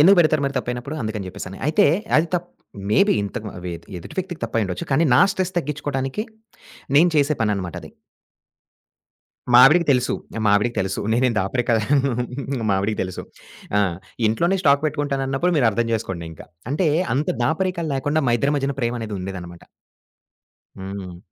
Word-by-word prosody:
ఎందుకు 190 +6 +7
పెడతారు 155 -3 +4
మరి 140 0 -2
తప్పైనప్పుడు? 125 +4 -4
అందుకని 110 -3 -3
జేప్పేసని. 95 0 -7
అయితే 155 - +4 0.3
అది 155 +2 +3
తప్ 175 0 -2 0.4
మేబీ 200 - +4
ఇంతకు 100 +2 -5 0.2
ఎ 85 - -4 0.2
ఎదుటి 85 - -11
వ్యక్తికి 180 -3 -4
తప్పయిండొచ్చు. 105 -6 -2
కానీ, 140 +5 +3
నా 125 - +6
స్ట్రెస్ 185 -1 -2
తగ్గిచుకోడానికి 145 +1 -3 0.7
నేను 170 +4 +6
చేసే 145 +1 +3
పననమాట 100 -5 -1
అది. - - -11 1.6
మావిడికి 140 +8 +7
తెలుసు. 125 -1 +1 0.3
మావిడికి 105 +4 +2
తెలుసు. 95 0 -2
నేనేం 120 0 +2
దాపరికాలు 125 +3 0
మావిడికి 100 +2 0
తెలుసు. 95 -1 -6 0.5
ఆ! - - +4 0.5
ఇంట్లోనే 170 - +1
స్టాక్ 140 0 +4
పెట్టుకుంటానన్నప్పుడు 145 +2 -1
మీరు 120 -5 +4
అర్థం 115 +2 -1
జేసుకోండింకా. 85 -7 -4 0.2
అంటే 160 +4 +1 0.3
అంత 145 +3 0 0.2
దాపరికాలు 170 +2 -1
లేకుండా, 145 +3 0
మా - - +3
ఇద్దరి 140 +5 +1
మధ్యన 140 0 -1
ప్రేమనేది 115 -3 -2
ఉండేదన్నమాట. 90 -2 -7 1.1
హ్మ్. 95 -2 -7
130 Hz, 135 wpm, -22 LUFS, 105-150 Hz, 1.6 s, ఎందుకు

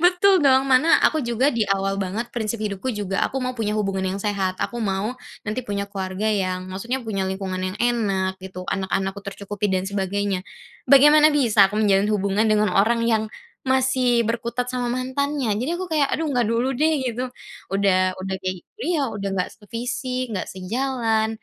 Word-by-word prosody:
betul 370 +2 +5
dong, 265 -2 +5
mana 270 +4 +5
aku 315 - +3
juga 245 +2 +1
di 235 -2 +1
awal 195 0 +1
banget 210 +6 -3
prinsip 230 -1 -2
hidupku 200 +4 -3
juga 195 -2 -2
aku - - -6
mau 255 - -1
punya 215 -3 -2
hubungan 195 -2 -1
yang - - -6
sehat, 195 -3 -1
aku 240 - -3
mau 200 +2 -1 0.3
nanti 215 +4 -2
punya 205 -4 -3
keluarga 190 0 -4
yang 185 -4 0
maksudnya 235 +8 -3
punya 195 -4 -2
lingkungan 190 -1 -3
yang - - -8
enak 195 -6 0
gitu. 185 -1 -8
Anak-anakku 195 +1 -2
tercukupi 200 +1 -3
dan 185 0 0
sebagainya. 200 -1 -1 0.5
Bagaimana 295 +3 +7
bisa 220 -8 +5
aku 210 - -5
menjalin 200 -1 +3
hubungan 200 +2 +1
dengan 215 -2 +3
orang 230 +4 +3
yang 220 -2 +2 0.4
masih 260 -2 +2
berkutat 235 +2 -2
sama 250 -1 -2
mantannya. 260 0 -1
Jadi 250 +8 -2
aku 370 +1 -5
kayak, 295 -3 +3
"Aduh, 320 0 0
nggak 245 -2 +2
dulu 235 +4 +1
deh," 310 +1 +2
gitu. 250 0 -2 0.5
Udah 185 -2 +3
udah 190 0 -3
kek 185 -1 -3
gi - - -36 0.3
iya, 290 -6 +1
udah 205 -3 -4
nggak 180 - -1
sevisi, 250 +4 -4
nggak 185 -4 -2
sejalan, 225 +3 0
215 Hz, 175 wpm, -23 LUFS, 195-255 Hz, 0.5 s, Bagaimana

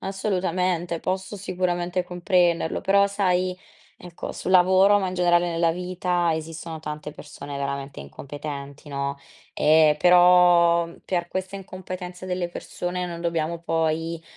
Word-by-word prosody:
assolutamente. 180 -3 -1
Posso 190 +2 -3
sicuramente 180 -2 -2
comprenderlo, 175 -2 +1
però 200 +1 +4
sai, 185 -2 0 0.4
ecco, 175 -1 -8
sul - - -5
lavoro, 190 +3 +6
ma 190 - -1
in 185 - -5
generale 175 -1 +2
nella 165 0 +1
vita, 180 -1 -1
esistono 160 0 -6
tante 150 0 -6
persone 140 -1 -9
veramente 140 - -4
incompetenti, 140 - -8
no, 140 0 -3 0.4
ehm, 155 -1 +4
però, 175 0 +5 0.2
per 175 -2 -2
questa 190 +1 -4
incompetenza 185 -1 -8
delle 180 -1 -2
persone, 180 +1 -4
non 170 -1 -6
dobbiamo 170 -1 -1
poi, 165 0 -1
175 Hz, 125 wpm, -24 LUFS, 160-185 Hz, 0.4 s, lavoro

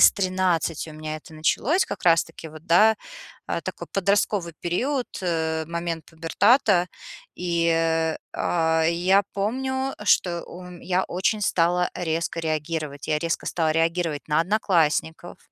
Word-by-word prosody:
с - - +9
13 185 -4 0
у - - -10
меня 155 0 -5
это 155 - -14
началось, 235 - +1
как 200 - -6
раз-таки 165 -1 +1
вот, 155 +2 -13
да, 215 +6 +5 0.5
э, - - -2
такой - - -6
подростковый 195 -2 +1
период, 250 +10 -1 0.2
э, 160 -2 -1
момент 170 0 -4
пубертата. 180 - +3 0.5
И, 170 -1 0
э, 165 -1 +1 0.2
а, 160 -1 +1
я 180 +4 +3
помню, 265 +6 -2
что 175 -4 +2
ум 180 -1 -11
я 185 0 0
очень 190 +4 -1
стала 180 -1 +2
резко 165 0 -2
реагировать. 155 -2 -3
Я 155 -1 +2
резко 165 +1 -2
стала 160 -2 0
реагировать 165 -1 0
на 150 +1 +3
одноклассников, 170 -4 0
170 Hz, 135 wpm, -24 LUFS, 160-185 Hz, 0.5 s, с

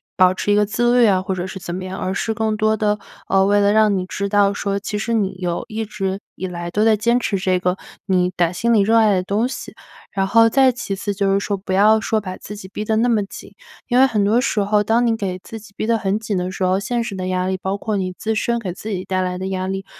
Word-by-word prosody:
保 185 0 +4
持 205 - -1
一 - - +4
个 210 - +4
自 240 +4 +2
律 235 - +6
啊， 190 -2 +3
或 190 - -2
者 185 0 -4
是 190 - -7
怎 175 -1 -6
么 185 - -5
样， 185 +1 -6
而 185 - -2
是 225 - -2
更 220 0 0
多 215 0 +1
地， 210 -1 0 0.3
呃， 195 0 +3
为 205 +1 +3
了 200 0 +3
让 215 -2 +4
你 180 - -2
知 200 +2 -3
道 200 -1 +3
说， 200 -1 -2
其 210 +1 -4
实 230 +2 -2
你 200 -3 0
有 175 -2 -2
一 220 +1 -3
直 195 -3 -3 0.2
以 190 - -5
来 175 -1 -5
都 210 +5 +1
在 220 - +5
坚 235 +3 +2
持 200 -5 -1
这 185 0 +1
个 180 0 0 0.3
你 180 -2 +2
打 170 -2 +2
心 235 +6 0
里 220 -3 +5
热 220 +3 +3
爱 215 -3 +4
的 185 - 0
东 210 +6 0
西。 - - -7 0.4
然 195 -1 0
后 225 +2 +5
再 265 +1 +4
其 240 -5 -4
次 205 +1 -3
就 200 0 0
是 195 - +3
说 200 0 -2
不 190 0 -7
要 210 +3 +4
说 220 +1 0
把 185 -3 -6
自 210 - -9
己 190 - -9
逼 200 +2 -5
得 220 +1 0
那 235 - +2
么 220 -4 +2
紧， - - -11 0.3
因 245 0 +1
为 265 - +7
很 210 -5 +1
多 225 +4 +3
时 225 - 0
候， 205 +1 +2
当 230 +3 +2
你 230 - +2
给 190 -4 -4
自 225 - -8
己 210 -1 -15
逼 - - -2
得 230 -1 +3
很 200 0 -1
紧 215 -2 -3
的 180 0 -2
时 190 - -4
候， 185 +1 +2
现 240 +4 -2
实 220 -4 -5
的 185 -1 -4
压 185 0 -1
力 190 - -1
包 195 +1 -2
括 215 +1 -3
你 185 -2 -2
自 220 - -2
身 235 +2 0
给 185 -6 -4
自 215 - -8
己 185 -3 -3
带 185 -1 -1
来 180 0 -2
的 190 +1 -4
压 185 -1 -2
力， 195 0 -4
200 Hz, 310 characters per minute, -20 LUFS, 190-220 Hz, 0.4 s, 为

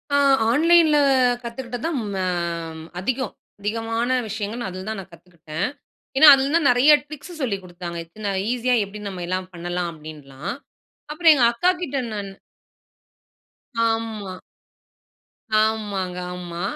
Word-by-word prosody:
ஆ - - +5 0.3
ஆன்லைன்ல 320 +2 +5 0.5
கத்துக்கிட்டது 240 +2 -6
தான் 305 -6 -1
ம - - -4 0.8
அதிகம். 260 +3 -2 0.3
அதிகமான 225 +3 -2 0.2
விஷயங்கள் 220 +3 -4
அதில 185 +1 -7
தான் 220 -3 -4
நான் 190 -1 -11
கத்துக்கிட்டேன். 170 +1 -5 0.5
ஏன்னா, 305 +2 +9
அதில 275 +3 -1
தான் 330 -4 +3
நெறைய 250 +5 +6 0.2
ட்ரிக்ஸ் 310 +3 -10
சொல்லிக் 200 -7 -2
கொடுத்தாங்க. 175 -1 -7
இத்தனை 205 +5 -6 0.2
ஈஸியா 250 0 +1
எப்டி 205 +2 -10
நம்ம 185 -2 -7
எல்லாம் 185 0 -2
பண்ணலாம்? 175 0 -3
அப்டின்லாம். 150 - -8 0.6
அப்புறம் 325 +1 +6
எங்க 250 -4 +3
அக்காகிட்ட 345 0 0
நான் 205 -2 -4 1.6
ஆமா. 220 -4 -4 1.2
ஆமாங்க, 205 -4 -1 0.2
ஆமா. 175 -1 -6
215 Hz, 120 wpm, -23 LUFS, 180-260 Hz, 1.6 s, ஏன்னா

